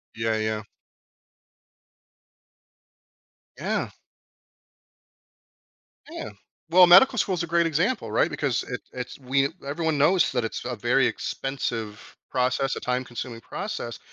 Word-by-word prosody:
Yeah, 115 0 0
yeah. 110 0 -2 2.9
Yeah. - - -2 2.2
Yeah. - - -6 0.4
Well, 180 +1 +8
medical 245 +9 +7
school 195 -3 +1
is 170 - -2
a - - -4
great 170 +1 +2
example, 180 - 0
right? - - +2
Because 135 -5 -1
it 125 - -6
it's 125 +1 -6
we 135 +1 +1 0.2
everyone 160 +1 -1
knows 170 +5 +4
that 125 -3 0
it's 115 - -5
a - - -3
very - - +2
expensive 115 -6 -4
process 130 +1 0
a - - -3
time 125 +1 -1
consuming 120 -1 -7
process, 160 - -5
135 Hz, 120 wpm, -25 LUFS, 120-170 Hz, 2.9 s, Well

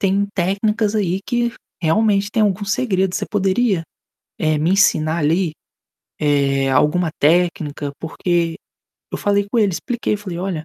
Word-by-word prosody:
tem 200 +1 +1
técnicas 205 +3 0
aí 190 -2 0
que, 240 -1 0 0.3
realmente, 200 +4 +2
tem 220 0 +1
algum 205 0 +1
segredo. 195 -3 0
Você - - -1
poderia, 195 -1 +1 0.6
eh, 155 -1 +1
me 160 +3 +1
ensinar 170 -5 +3
ali, 165 +2 +1 0.7
eh, 140 -2 +1
alguma 155 +6 +2
técnica? 155 -3 +1
Porque", 165 0 -1 0.6
eu - - -1
falei 200 0 +1
com 220 - -2
ele, 210 -4 +3
expliquei, 240 +2 -2
falei: 190 -4 -7
"Olha, 180 -4 -3
185 Hz, 140 wpm, -19 LUFS, 160-205 Hz, 0.7 s, ensinar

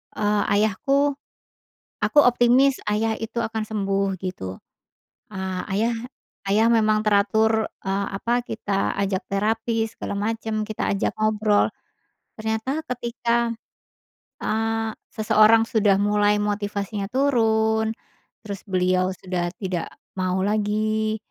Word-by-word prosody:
eee, 210 0 +1
ayahku 275 +7 +2 0.9
aku 295 - +1
optimis 245 +2 +4
Ayah 220 +2 +1
itu 225 +1 -5
akan 220 -1 -2
sembuh, 195 -2 -1
gitu. 95 - -5 0.7
Ah, 190 -2 -4
Ayah 215 +5 +1 0.6
Ayah 215 +3 +4
memang 215 -2 +3
teratur, 220 +2 +3 0.2
eee, 195 +1 -1
apa, 240 +4 0
kita 205 -4 -2
ajak 195 +1 0
terapi, 225 +3 0
segala 205 - -5
macem, 220 +1 -2
kita 215 - -3
ajak 195 - 0
ngobrol. 215 -1 +3 0.7
Ternyata 220 +8 -2
ketika, 235 -1 0 0.9
eee, 225 0 0 0.2
seseorang 215 +1 +5
sudah 210 -4 +3
mulai 205 0 +3
motivasinya 205 -1 -2
turun, 220 -5 +2 0.5
terus 200 -3 -7
beliau 185 0 +1
sudah 175 -1 -3
tidak 185 -4 -3 0.3
mau 185 0 0
lagi, 215 +1 0
215 Hz, 105 wpm, -23 LUFS, 200-225 Hz, 0.9 s, seseorang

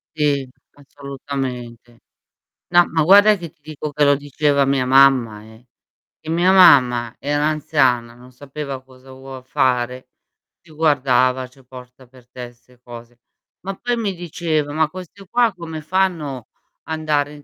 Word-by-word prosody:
Sì, 145 -3 0 0.3
assolutamente. 135 -4 -8 0.7
No, 175 0 +4
ma 160 0 0
guarda 205 +5 +6
che 170 -4 -9
ti 165 -1 -41
dico 150 0 -7
che 150 +1 +1
lo 145 0 +4
diceva 145 0 0
mia 135 -1 0
mamma, 130 -5 +4
eh. 110 +2 -18 0.5
E 160 - -11
mia 175 +3 +2
mamma 125 -11 +5
era 145 +1 -1
anziana, 130 -6 0
non 125 +1 -17
sapeva 140 0 -8
cosa 130 0 -18
vuol 130 0 -11
fare, 125 0 -1 0.5
ti 175 - -24
guardava, 130 -4 +1
"C'è 130 +2 -22
posta 125 0 -14
per 125 -1 -21
te", 125 -1 -9
'ste 125 +1 -27
cose. 120 0 -12 0.4
Ma 195 +1 -6
poi 245 +5 -2
mi 210 -4 -2
diceva: 160 -4 -3
"Ma 160 0 +1
queste 185 +3 -11
qua, 235 +2 +2
come 160 -3 -8
fanno 155 -7 -2 0.4
andare 150 -2 -2
in 145 -1 -14
140 Hz, 150 wpm, -19 LUFS, 125-155 Hz, 0.7 s, guarda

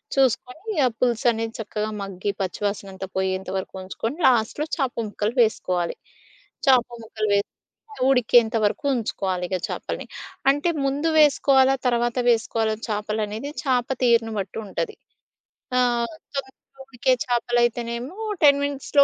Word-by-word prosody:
చూసుకొని 270 - 0
ఆహ్, 245 - +1
పులుసనేది 230 -2 +1
చక్కగా 215 0 -3
మగ్గి 195 +1 -3
పచ్చివాసన 195 +1 -3
అంత 190 - -5
పోయేంత 190 0 -1
వరకు 190 - -5
ఉంచుకొని 225 +8 -4
లాస్ట్‌లో 250 +5 +2
చేప 270 -5 0 0.2
ముక్కలు 210 +4 -2
వేసుకోవాలి. 180 -6 0 0.7
చేప 255 -3 +6 0.2
ముక్కలు 215 -1 -3
వేసి 200 - 0 0.6
ఉడికేంత 240 -2 +4
వరకు 210 +8 -1
ఉంచుకోవాలి 190 -5 -2
ఇగా 185 -1 -1
చేపల్ని. - - -4 0.4
అంటే 290 +5 +2 0.2
ముందు 285 +4 0
వేసుకోవాలా, 270 -2 +5
తర్వాత 240 0 +1
వేసుకోవాలా 225 -1 0
చేపలనేది 215 +4 -2
చాప 255 -4 +1 0.2
తీరును 230 -2 +3
బట్టి 195 +1 -5
ఉంటది. 430 - -3 0.8
ఆహ్, 240 +1 +1 0.2
తొందరగా 265 -1 -5 0.3
ఉడికే 260 0 +1
చేపలయితేనేమో 240 +2 0 0.3
10 280 -1 +7
మినిట్స్‌లో 285 0 +3
235 Hz, 120 wpm, -24 LUFS, 210-265 Hz, 0.8 s, 10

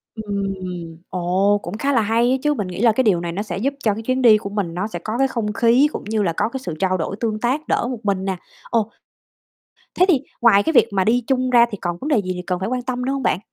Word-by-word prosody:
Ừm, 205 -3 -3 0.7
ồ, 185 +3 +1
cũng 180 +5 -5
khá 280 +5 0
là 235 - +3
hay 230 +3 +2
á 260 - +2
chứ, 295 0 +2
mình 205 -9 -3
nghĩ 180 +2 -5
là 235 -1 +5
cái 260 +4 +1
điều 200 -7 +3
này 170 -1 -3
nó 185 +4 -3
sẽ 180 -5 -5
giúp 275 +8 -1
cho 215 - +2
cái 220 - -6
chuyến 255 +3 0
đi 225 -4 +7
của 200 - -6
mình 200 -5 -3
nó 185 +4 -2
sẽ 175 -5 -6
có 215 +6 -4
cái 270 +1 +3
không 220 -5 -3
khí, 235 +6 +4
cũng - - -6
như 215 0 -1
là 170 -4 0
có - - +1
cái 265 - -5
sự 170 - -4
trao 185 -1 +1
đổi 180 +3 -3
tương 220 -2 -1
tác 265 +7 -1
đỡ 235 - 0
một 245 - -5
mình 195 -2 0
nè. 190 -1 -2 0.3
Ồ. 225 -2 0 1.1
Thế 365 - +7
thì 295 -8 +4 0.2
ngoài 215 -4 +5
cái 320 - 0
việc 260 - +6
mà 190 -1 +2
đi 240 +5 +2
chung 255 -1 +1
ra 240 -1 +6
thì 205 - -5
còn 175 -2 -2
vấn 285 - -4
đề 295 -5 +3
gì 185 -1 -4
gì 180 - -5
cần 180 -1 -1
phải 190 +4 -2
quan 255 0 -1
tâm 250 0 -3
nữa 265 - 0
hông 275 -1 -3
bạn? - - +1
220 Hz, 295 wpm, -21 LUFS, 195-250 Hz, 1.1 s, đi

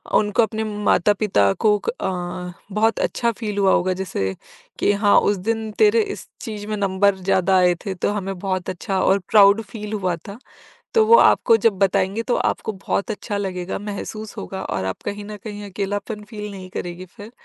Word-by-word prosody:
उनको 210 +2 +3
अपने 220 0 -2
माता-पिता 205 - +2
को 210 -1 +5
अ, 180 -5 -4 0.2
बहुत 220 +3 +1
अच्छा 235 -1 0
फील 210 -3 -3
हुआ 195 -1 +4
होगा। 185 +1 +2
जैसे 95 - -2 0.4
कि - - +3
हाँ 205 - +6
उस 205 -1 +1
दिन 220 -1 -1
तेरे 435 +1 +5
इस - - -12
चीज़ 210 -3 -6
में 215 - -2
नंबर 200 0 +2
ज़्यादा 190 0 +2
आए 180 -1 +4
थे 195 - -2
तो 180 - -1
हमें 195 -2 -4
बहुत 185 -1 -2
अच्छा 190 +1 -2
और 195 +1 +3
प्राउड 205 +1 +6
फील 210 0 -8
हुआ 185 -4 0
था। 200 +2 -8 0.6
तो 450 -2 +5
वो 460 - +8
आपको 230 - +5
जब 220 - +2
बताएँगे 195 +2 +1
तो 245 - 0
आपको 220 - -1 0.2
बहुत 200 - 0
अच्छा 205 -1 -4
लगेगा 185 -2 -3
महसूस 210 +1 -6
होगा 190 0 -5
और 95 - -3
आप 95 - -4
कहीं 205 0 -4
न 210 0 -7
कहीं 205 -1 -6
अकेलापन 205 +2 -4
फील 210 -2 -6
नहीं 190 -2 -9
करेगी 175 +1 -5
फिर। 210 +1 -10
200 Hz, 185 wpm, -22 LUFS, 190-215 Hz, 0.6 s, वो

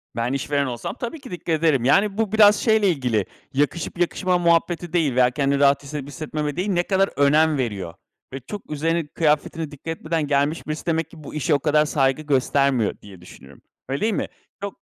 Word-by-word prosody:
Ben 120 +2 -1
işveren 140 +1 0
olsam 125 - -5
tabii 245 +6 -5
ki 255 - -11
dikkat 175 - -7
ederim. 155 -6 +2
Yani, 195 +8 +3
bu 220 -2 0
biraz 210 -1 +6
şeyle 215 -1 +2
ilgili, 125 - 0 0.3
yakışıp 150 +5 -1
yakışmama 180 +1 +1
muhabbeti 170 0 +1
değil 155 -7 +1
veya 125 -1 +5
kendini 140 +1 0
rahat 140 0 +4
hissedip 140 -1 -6
hissetmeme 150 0 -4
değil, 185 +4 -2
ne 175 -3 +1
kadar 195 +1 +1
önem 150 +2 +3
veriyor 100 -9 -3 0.4
ve 135 - -4
çok 195 - -9
üzerine 165 +2 -1
kıyafetine 155 0 0
dikkat 145 +2 -14
etmeden 160 -2 -2
gelmiş 145 +3 0
birisi. 155 0 -4
Demek 165 -2 -1
ki 160 -2 -14
bu - - -9
işe 155 +1 +1
o 140 - +3
kadar 150 +1 +2
saygı 135 -1 +1
göstermiyor 140 -4 +1
diye 95 -3 -13
düşünüyorum. 70 -5 -15 0.3
Öyle 135 +1 -2
değil 220 0 +1
mi? - - -2 0.3
Çok 200 -1 -5
150 Hz, 195 wpm, -22 LUFS, 140-175 Hz, 0.4 s, biraz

